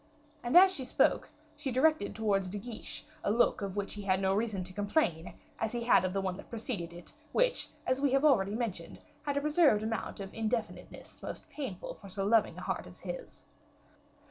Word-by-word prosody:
And 240 +7 +4
as 375 +1 +9
she 275 - -4
spoke, 255 - +2 0.3
she 290 -2 -4
directed 265 -2 +2
towards 200 -4 +1
De 205 - -4
Guiche 220 +2 -7 0.2
a - - +1
look 230 +1 +3
of 195 -1 -3
which 200 -1 -2
he 210 - -6
had 190 -1 +1
no 190 0 +2
reason 205 -2 -1
to 185 +1 -8
complain, 200 - 0 0.2
as 220 +1 -1
he 240 -1 -2
had 235 - +5
of 185 - 0
the 195 +1 -1
one 185 -1 -2
that - - -11
preceded 220 -7 -4
it; 170 0 -12 0.2
which, - - +2 0.2
as 255 +1 +1
we 285 -2 +3
have 275 +2 +4
already 205 -8 +4
mentioned, 200 -8 -4 0.2
had 290 -2 -2
reserved 300 -8 +4
a - - -2
certain 225 - 0
amount 225 - -4
of 195 -1 -7
indefiniteness 225 0 -4
most - - -7
painful 255 -12 -5
for 200 - -10
so 195 +1 -3
loving 220 +1 +3
a - - -6
heart - - -3
as - - -14
his. - - -7
215 Hz, 210 wpm, -32 LUFS, 195-260 Hz, 0.3 s, as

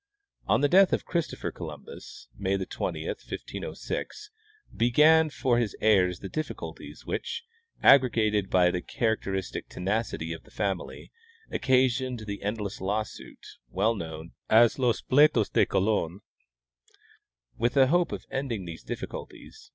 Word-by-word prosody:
On - - +3
the 145 - +4
death 190 +5 +5
of - - 0
Christopher 170 -3 -2
Columbus - - -10
(May 95 +8 0
20, 95 - -4
1506) 425 0 -6 0.4
began 155 +7 +5
for 130 -4 +1
his 115 -4 -1
heirs 90 -5 +3
the 95 - -5
difliculties 155 +8 -6
which, - - -4 0.4
aggregated 110 -7 +4
by 90 -1 +4
the 90 - -2
character 110 -3 -1
istic 95 -1 -4
tenacity 95 -4 -2
of 80 - -9
the - - -21
family, 95 -3 -4 0.4
occasioned 130 -2 +1
the 100 -2 -6
endless 105 -1 -4
lawsuit, 105 +3 -4 0.2
well 105 - +1
known 80 -4 -7 0.2
as 115 +3 +5
Los 125 -3 +1
Pleitos 130 -6 +4
de - - +3
Colon. 95 -2 0 1.4
AVith 120 +3 +1
a 135 - +7
hope 175 +6 +2
of - - -6
ending 120 -8 -3
these 85 -1 -8
difficulties. - - -8
110 Hz, 130 wpm, -27 LUFS, 95-130 Hz, 1.4 s, a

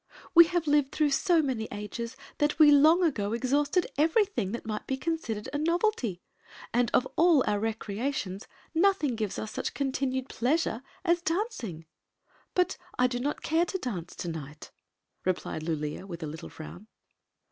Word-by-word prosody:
" - - -21
We 340 -1 +10
have 350 -1 -1
lived 290 -2 +3
through 300 -2 +1
so 330 +3 +3
many 245 -6 -2
ages 230 +4 -5 0.2
that 295 0 +1
we 305 -2 +8
long 310 +5 +6
ago 220 -10 0
exhausted 285 +8 +1
everything 330 - +2
that 235 - -5
might 215 -1 -4
be 265 - -1
considered 265 -8 -3
a 290 - -1
novelty, 325 - 0 0.5
and 240 -1 +2
of 255 - +3
all 330 -5 +5
our 205 -1 +1
recreations 220 -1 -3 0.3
nothing 330 -7 +2
gives 215 -3 -3
us 215 - -4
such - - -4
continued 265 -1 -1
pleasure 255 -1 0 0.2
as 340 -1 +3
dancing." 330 - -3 0.7
"But 360 -1 +2 0.2
I 250 - +4
do 245 -1 0
not 285 +4 -2
care 325 +2 +2
to 380 - -3
dance 190 - -5
to - - -5
night! 150 -2 -7 0.5
replied 180 -3 -2
Lulea, 155 +2 -3
with 170 -3 -7
a - - -3
little 155 +2 -8
frown. 175 +6 -10
260 Hz, 165 wpm, -28 LUFS, 210-320 Hz, 0.7 s, We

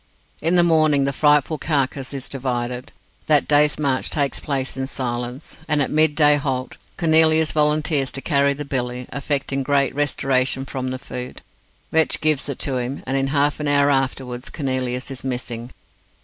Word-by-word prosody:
In 165 +3 +1
the 175 - +6
morning 155 -4 +3
the 140 - -1
frightful 150 +1 +2
carcase 140 -3 -1
is 135 -2 -5
divided. 125 -1 -4 0.4
That 150 -2 +4
day's 150 0 +4
march 140 -4 0
takes 140 -3 0
place 135 -2 -2
in 135 0 -3
silence, 125 +1 -4
and 150 -1 +2
at 140 - 0
midday 150 -1 +4
halt 130 -3 -3 0.2
Cornelius 160 -1 +4
volunteers 150 -2 +1
to - - -3
carry 140 -2 +2
the 145 +1 -6
billy, 125 -2 -3
affecting 140 -1 -2
great 140 -1 +1
restoration 135 -2 0
from 130 -2 -4
the 130 - -3
food. 125 -1 -7 0.5
Vetch 160 -1 +2
gives 150 -2 +1
it 140 - -3
to 135 -2 -1
him, 125 +3 -4
and 130 - -2
in 135 0 +1
half 145 +1 +1
an 150 - -2
hour 145 0 +3
afterwards 130 -2 -2
Cornelius 130 -2 -3
is 130 - -6
missing. 125 -2 -4
140 Hz, 165 wpm, -21 LUFS, 130-150 Hz, 0.5 s, the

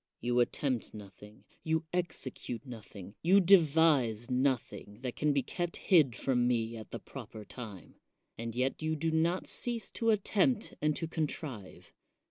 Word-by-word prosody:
You 120 +1 +1
attempt 125 -1 0
nothing, 105 0 -12 0.2
you 160 0 0
execute 130 -9 -3
nothing, 105 -6 -10
you 185 +4 +6
devise 155 - +4
nothing 125 -5 -1
that 125 -2 -4
can 150 0 +1
be 140 -2 +1
kept 175 +5 -3
hid 155 - +4
from 125 -1 +1
me 115 -2 0
at 110 -2 -9
the - - -5
proper 110 -1 -9
time; 105 -9 -10 0.4
and 115 0 -5
yet 130 +4 0
you 155 0 0
do 160 +2 -1
not 165 +3 +1
cease 235 -4 -3
to 230 - 0
attempt 215 +2 +2
and 150 0 +2
to 165 - -3
contrive. 150 - -5
135 Hz, 150 wpm, -32 LUFS, 115-165 Hz, 0.4 s, you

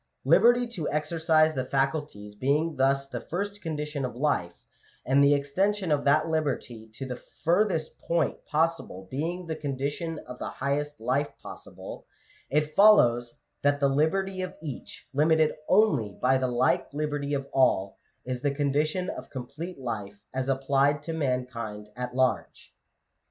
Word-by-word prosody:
Liberty 245 +1 +5
to 185 -10 -3
exercise 155 +1 +2
the 130 - -1
faculties 135 -6 -2
being 145 +8 0
thus 135 +1 +2
the - - -5
first 200 +4 -4
condition 150 -3 -3
of 125 -2 -3
life, 120 - -1 0.4
and 135 +2 +4
the 145 +1 +6
extension 185 +6 0
of 145 -1 +1
that 155 +3 +4
liberty 135 -8 -2
to 135 - -5
the 125 -1 -6 0.2
furthest 170 -2 +1
point 170 0 -1
possible 155 - -1
being 170 +6 -3
the 160 -1 -3
condition 145 +2 -3
of 125 - -9
the - - -4
highest 145 +2 -2
life 130 +5 0
possible, - - -10 0.4
it 150 +2 0
fol 210 +1 +9
lows 120 0 +2 0.3
that 145 0 +2
the 140 -1 +3
liberty 185 +7 +1
of 185 - -5
each, 145 -6 -8
limited 155 +2 +3 0.2
only 150 - +3
by 130 +1 +3
the 130 -1 +1
like 125 +2 +1
liberty 145 -1 -1
of 140 0 -3
all, 100 -7 +2 0.3
is 125 -1 -3
the 145 - +1
condition 150 +5 0
of - - -6
complete 150 +8 -7
life 105 -5 -5
as 130 +1 -2
applied 135 +2 +2
to 165 - -4
mankind 125 -7 -3
at 125 0 -5
large. 130 -1 -1
145 Hz, 150 wpm, -27 LUFS, 130-160 Hz, 0.4 s, fol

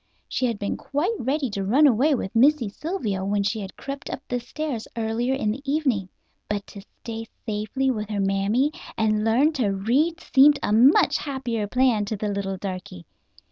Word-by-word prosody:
She 255 - 0
had 230 -3 -2
been 205 0 -3
quite 310 +11 -1
ready 270 +3 0
to 200 -1 -3
run 255 +10 +4
away 275 +3 +4
with 210 -3 -5
Missy 265 0 +4
Sylvia 215 - -3
when 200 +1 0
she 215 +2 -1
had 195 -2 -7
crept 275 0 -6
up - - -4
the 245 - -1
stairs 250 -1 -5
earlier 230 +3 0
in 215 -6 0
the 250 +6 -5
evening. 275 - 0 0.4
But 205 -1 -2
to 200 - -9 0.2
stay 225 -1 -6 0.2
safely 220 +5 -1
with 215 -3 -4
her 210 -2 -2
mammy 200 +8 +1 0.3
and 215 -1 +1
learn 255 +8 +3
to 255 -8 0
read 255 - +1
seemed 290 -1 +5
a 205 - +1
much 250 +7 +5
happier 245 -7 -3
plan 245 -3 +2
to 215 +1 -3
the 210 +1 -2
little 195 -1 -3
darky. 185 -2 -7
225 Hz, 185 wpm, -24 LUFS, 205-270 Hz, 0.4 s, seemed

